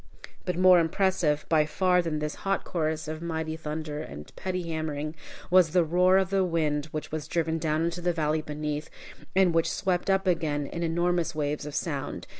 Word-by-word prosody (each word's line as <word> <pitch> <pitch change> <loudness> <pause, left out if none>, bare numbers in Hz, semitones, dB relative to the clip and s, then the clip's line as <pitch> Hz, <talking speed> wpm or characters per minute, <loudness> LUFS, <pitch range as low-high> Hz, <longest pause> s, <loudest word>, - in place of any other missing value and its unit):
But 180 -2 -2
more 185 -1 +7
impressive 165 -2 +1
by 155 -2 +3
far 180 +2 +3
than 165 -3 -2
this 150 0 -2
hot 195 0 0
chorus 160 -2 -2
of 155 +1 -5
mighty 160 -1 -3
thunder 155 -1 -4
and 75 - -9
petty 185 -1 -3
hammering, 155 -2 -3 0.4
was 180 -4 +5
the 180 -2 +5
roar 180 +3 +4
of 190 0 +1
the 195 -1 +3
wind 155 -4 0
which 155 -1 -6
was 155 -1 -4
driven 165 -1 0
down 155 0 0
into 170 +1 -3
the 175 0 +1
valley 155 -2 0
beneath, 150 0 -4 0.5
and 190 -3 +4
which 165 0 +2
swept 185 -1 -1
up 195 0 +2
again 160 -5 0
in 170 +4 -5
enormous 170 0 0
waves 150 -1 -2
of 150 - -6
sound. 145 -5 -3
160 Hz, 190 wpm, -27 LUFS, 150-180 Hz, 0.5 s, more